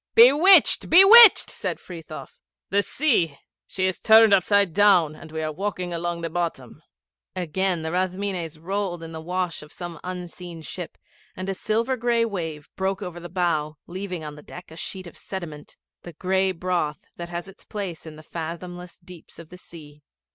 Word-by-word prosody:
'Bewitched! 290 +11 +6
Bewitched!' 400 +5 +9
said - - -4
Frithiof. 165 -3 -10 0.4
'The 200 +1 +3
sea 200 - 0 0.3
she 185 - -2
is 185 -1 -2
turned 220 -1 +6
upside 200 -1 +3
down, 185 -6 +4
and 155 - -13
we 160 0 -4
are 155 - -2
walking 180 +1 -4
along 170 0 -3
the 165 - -3
bottom.' 165 -8 -4 0.5
Again 180 0 -1
the 160 - -3
Rathmines 185 -2 -2
rolled 180 0 -4
in 165 - -8
the 160 -1 -7
wash 180 0 -3
of 150 0 -14
some 175 -2 -8
unseen 180 -2 -8
ship, 175 +1 -8 0.4
and 185 +1 -4
a - - -2
silver 230 +6 -1
gray 235 -1 +1
wave 160 -8 -5
broke 190 +2 -2
over 175 -2 -7
the 175 0 -9
bow, 160 -4 -1
leaving 180 -2 -6
on 150 -1 -7
the 150 - -12
deck 175 +2 -12
a - - -11
sheet 185 +3 -6
of 175 - -12
sediment 160 -6 -8 0.2
the 175 - -11
gray 190 +3 0
broth 175 -4 -3
that 170 0 -7
has 175 +1 -6
its 195 +2 -15
place 190 -7 -6
in 155 - -9
the 155 - -13
fathomless 175 +2 -7
deeps 180 -3 -15
of 165 -1 -12
the 180 - -12
sea. 150 -4 -14
180 Hz, 175 wpm, -24 LUFS, 165-195 Hz, 0.5 s, Bewitched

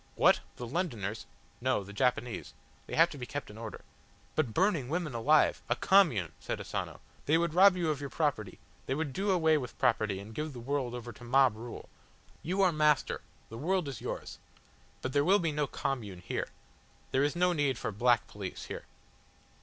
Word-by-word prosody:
"What! - - +5 0.2
the 120 - -6
Londoners?" 115 - -3 0.3
"No, 130 -5 +1
the 100 +1 -11
Japanese. 125 +1 -1 0.3
They - - -4
have 165 +2 +5
to 145 - -8
be 125 - -5
kept 145 -5 -5
in 105 - -12
order." 115 -2 -7 0.5
"But 150 -7 0
burning 165 - +1
women 165 -3 -2
alive!" 145 +7 +3
"A - - +3
Commune!" 145 - +4
said - - -4
Asano. - - -5 0.3
"They 155 +3 +5
would 170 -1 0
rob 190 +1 +7
you 165 -3 +1
of 145 -2 -3
your 140 - -4
property. 135 - -1 0.3
They 135 - 0
would 150 -2 -2
do 200 +6 -1
away 160 -5 +4
with 125 -3 -7
property 105 -4 +1
and 105 +3 -10
give 150 +4 -4
the 125 - -8
world 125 -1 -2
over 120 -1 -7
to 120 - -14
mob 130 -1 +4
rule. 115 +2 -8 0.5
You 190 +4 +1
are 185 - +5
Master, 150 -2 +2 0.3
the 115 - -8
world 180 +1 0
is 135 -6 -6
yours. - - -5 0.6
But 130 - -2
there 145 - +4
will 190 +6 +5
be 165 -5 0
no 150 -1 0
Commune 105 -12 -3
here. - - -2 0.6
There 135 - +3
is 145 +3 +1
no 180 +1 +3
need 145 -6 +1
for - - -3
black 120 +2 +3
police 100 -3 -7
here. - - -7
135 Hz, 195 wpm, -31 LUFS, 120-160 Hz, 0.6 s, rob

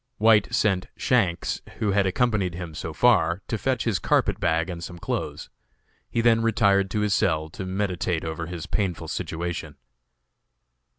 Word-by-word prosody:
White 110 -1 +4
sent 95 -4 +1
Shanks, 95 -9 +1 0.2
who 105 - 0
had 100 0 +2
accompanied 100 -3 +1
him 85 -2 -6
so 80 +1 -5
far, 90 -1 +3
to - - -2
fetch 130 +3 0
his 110 -7 0
carpet - - +1
bag 80 +1 +1
and 85 -2 -6
some 85 - -7
clothes. - - -4 0.6
He 115 - 0
then 115 -1 +4
retired 100 -4 +3
to 105 - -1
his 105 -1 +1
cell 80 -5 +1
to 95 +3 -7
meditate 95 -3 -1
over 80 0 -4
his 85 -2 -6
painful 90 -6 -2
situation. 85 +2 -4
95 Hz, 160 wpm, -25 LUFS, 85-105 Hz, 0.6 s, White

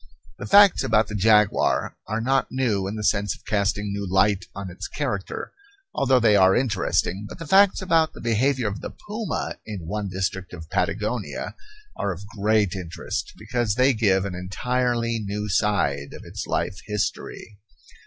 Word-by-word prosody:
The - - -6
facts 200 -5 +6
about 110 -4 +2
the - - -6
jaguar 105 0 +3
are 110 +1 -2
not 135 +3 +1
new 115 -7 0
in 100 - -4
the 105 - -4
sense 100 0 +1
of - - -21
casting 105 -1 0
new 100 0 -3
light 100 +1 +3
on 100 -2 -6
its 90 - -6
character, 120 -10 -4 0.4
although 130 -1 +3
they 110 -3 +4
are 95 -1 +5
interesting; 105 -4 0
but - - -9
the 165 - -7
facts 195 +3 +4
about 165 -3 +2
the - - -11
behavior 120 +2 +1
of 100 0 -4
the - - -5
puma 210 -3 -4
in 100 -6 -7
one 105 +3 -3
district 95 0 -3
of 80 -3 -10
Patagonia 105 +2 -2 0.4
are 100 - -1
of 95 +2 -7
great 105 -1 +2
interest, 90 -4 -5
because 120 -4 -1
they 130 +2 +4
give 100 -4 +2
an 100 - -4
entirely 115 +5 -1
new 105 0 -4
side 85 -8 0
of - - -11
its - - -6
life 90 - -2
history. 105 0 -4
105 Hz, 170 wpm, -24 LUFS, 100-125 Hz, 0.4 s, facts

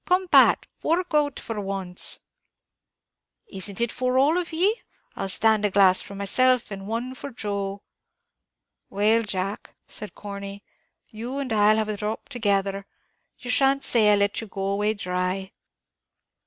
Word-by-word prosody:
come, 370 0 +1
Pat, - - +6
fork 345 +1 -1
out 295 -2 +1
for 220 -2 -5
once." 195 -2 0 1.2
"Is 195 0 -4
it 230 +4 -2
for 255 0 -1
all 295 +6 +3
of 350 -1 -5
ye? 385 +8 +1 0.3
I'll 195 - -4
stand 220 +2 +3
a 210 - +2
glass 190 -1 +4
for 200 - -10
myself, 250 +5 +2
and 195 0 -7
one 235 +4 -3
for 270 +2 -8
Joe." 200 -4 -4 1.1
"Well, 215 +3 +2
Jack," 200 -1 -5
said 210 - -8
Corney, 200 0 -8 0.5
"you 235 +5 -6
and 270 -5 -3
I 210 0 +4
'll - - 0
have 215 -1 -1
a 210 - -2
dhrop 210 +2 -5
together; 200 -5 -1 0.5
you 245 - -5
shan't 275 +1 +3
say 215 -3 +5
I - - +5
let 200 +1 0
you 225 - -8
go 195 -1 -5
away 205 +2 0
dhry." 185 0 -3
210 Hz, 155 wpm, -24 LUFS, 200-255 Hz, 1.2 s, Pat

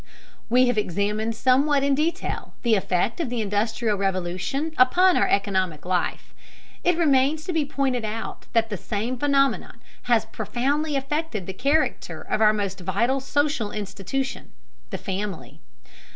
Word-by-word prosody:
We 250 +2 +5
have 245 -3 +2
examined 210 +3 -1
somewhat 275 +4 +3
in 280 0 +3
detail 310 +5 -2
the 235 -2 +3
effect 190 - +1
of 330 - -1
the 245 -1 -2
Industrial 215 +1 0
Revolution 195 - -2
upon 360 +9 +5
our - - +3
economic 190 -6 0
life; 180 0 -2 0.5
it 355 -1 +3
remains 295 -1 +3
to 360 - -3
be 315 -3 +1
pointed 270 -4 -1
out 220 +1 -5
that 225 -1 +2
the 205 - -2
same 220 +7 -3
phenomenon 275 +1 +1 0.3
has 225 -2 +4
profoundly 260 +8 -1
affected 275 - -2
the 190 - -5
character 285 +10 0
of - - -2
our 215 -1 +7
most 200 -3 -3
vital 205 +9 0
social 285 -4 0
institution, 210 +6 -4 0.4
the - - -4
family. 185 - -5
235 Hz, 145 wpm, -24 LUFS, 205-275 Hz, 0.5 s, our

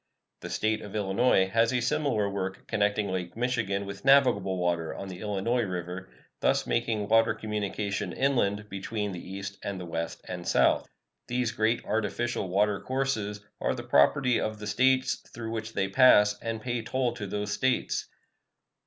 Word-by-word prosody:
The - - -7
State 110 0 0
of 105 0 -9
Illinois 100 0 +3
has 115 +4 +3
a 125 - +1
similar 125 -5 +1
work 95 -1 -4
connecting 105 -1 +1
Lake 90 +1 -4
Michigan 115 -5 -1
with 100 0 -8
navigable 125 -9 +4
water 85 -2 -1
on 95 - -6
the 90 -1 -8
Illinois 105 +4 0
River, 90 -2 -4 0.3
thus - - +2
making 115 -3 0
water 115 +1 +4
communication 105 -2 -3
inland 105 -7 +1
between 105 +1 -3
the 90 - -6
East 100 +1 -7
and 100 -2 -4
the 90 - -6
West 85 0 -4
and - - -6
South. - - +3 0.4
These 125 -1 0
great 110 +2 0
artificial 110 -1 -1
water 100 +2 +2
courses 115 -6 -2 0.2
are - - 0
the - - -6
property 125 - +4
of 110 0 -2
the 105 - -8
States 130 +4 +2
through 115 -1 -6
which 110 0 -4
they 95 - 0
pass, 105 -2 +6
and 115 -1 -4
pay 120 -1 -1
toll 125 +1 -1
to 105 -4 -6
those 105 +1 -3
States. 130 -1 0
105 Hz, 165 wpm, -28 LUFS, 100-120 Hz, 0.4 s, pass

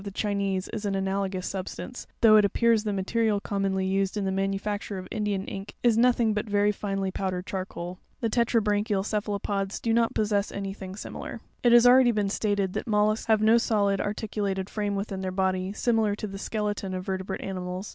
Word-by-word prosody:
the 200 - -5
Chinese 200 -2 -1
is 215 - -5
an 200 -2 -1
analogous 190 -1 -1
substance, 195 +6 -6
though 220 -2 +7
it 210 - +7
appears 225 +2 +3
the 210 - -1
material 205 +2 +1
commonly 195 -2 -1
used 195 +1 0
in 200 - -1
the 190 - 0
manufacture 195 +1 -2
of 185 0 -7
Indian 205 -2 -1
ink 195 +1 -7
is 240 -2 +4
nothing 235 -1 +3
but 210 +1 -3
very 205 0 +3
finely 195 -2 -2
powdered 185 -1 -3
charcoal. 185 -2 -5 0.2
The 235 - 0
tetrabranchial 210 -3 +1
cephalopods 200 -2 -2
do 230 - 0
not 230 0 +2
possess 205 -1 +1
any 195 -1 -4
thing 190 -1 -8
similar. 210 - -7 0.3
9. - - -9
It 240 - +6
has 240 -1 +8
been 245 - +8
already 240 -6 +4
stated 200 -2 0
that - - -4
mollusks 215 0 +2
have 220 -1 +3
no 225 +2 +6
solid, 200 -4 +1
ar 205 +1 -2
ticulated 200 -3 -3
frame 205 -2 -1
within 195 -1 -3
their 190 - -2
body, 185 0 0
similar 220 -1 +1
to 210 - -5
the 195 -1 -6
skeleton 205 -3 -2
of 185 0 -5
ver 190 -1 -2
tebrate 190 - -5
animals. 185 0 -4
200 Hz, 200 wpm, -27 LUFS, 195-215 Hz, 0.3 s, has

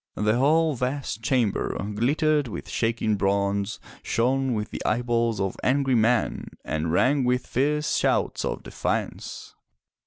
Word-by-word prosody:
The 105 +3 +1
whole 155 +3 +3
vast 125 -3 -3
chamber 120 -4 0 0.2
glittered 145 +6 +1
with 110 - -7
shaking 115 -2 0
bronze, 100 0 0 0.2
shone 130 +1 +1
with 105 0 -3
the - - -5
eyeballs 115 -1 0
of 95 -1 -1
angry 135 0 +2
men, 115 0 +2 0.2
and 80 +1 -2
rang 135 - +3
with 125 0 +1
fierce 150 +3 0
shouts - - +1
of - - -3
defiance. - - -4
120 Hz, 130 wpm, -25 LUFS, 105-135 Hz, 0.2 s, whole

